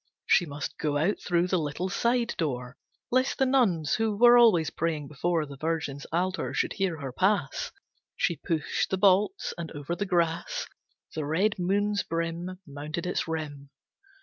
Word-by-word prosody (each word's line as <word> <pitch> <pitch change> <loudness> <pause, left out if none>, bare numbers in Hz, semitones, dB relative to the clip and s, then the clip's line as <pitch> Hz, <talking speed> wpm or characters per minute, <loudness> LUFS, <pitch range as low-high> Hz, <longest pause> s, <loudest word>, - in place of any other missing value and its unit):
She 175 - +4
must 145 0 -6
go 145 -2 0
out 170 +8 +1
through 175 -1 +1
the 185 - +2
little 155 +4 -2
side 235 +5 +1
door 125 -5 -2 0.4
Lest 255 +2 +2
the 265 - +3
nuns 200 - +2
who 220 -2 0
were 240 +2 +8
always 215 -10 +5
praying 155 -3 -2
before 160 +2 0
The 140 -1 -10
Virgin's 155 -2 -3
altar 185 +3 -1
should - - 0
hear 185 -5 -1
her 135 -2 -4
pass. 185 -1 0 0.4
She 170 - 0
pushed 160 +1 -1
the 190 - 0
bolts, 200 - +3
and 165 -2 -4
over 145 +4 -4
the 200 +3 -3
grass 175 - 0 0.5
The 155 - -3
red 185 +8 +1
moon's 205 +3 +1
brim 165 +2 -3
Mounted 150 +4 -5
its 180 - -1
rim. 150 -3 -5
170 Hz, 165 wpm, -28 LUFS, 150-200 Hz, 0.5 s, were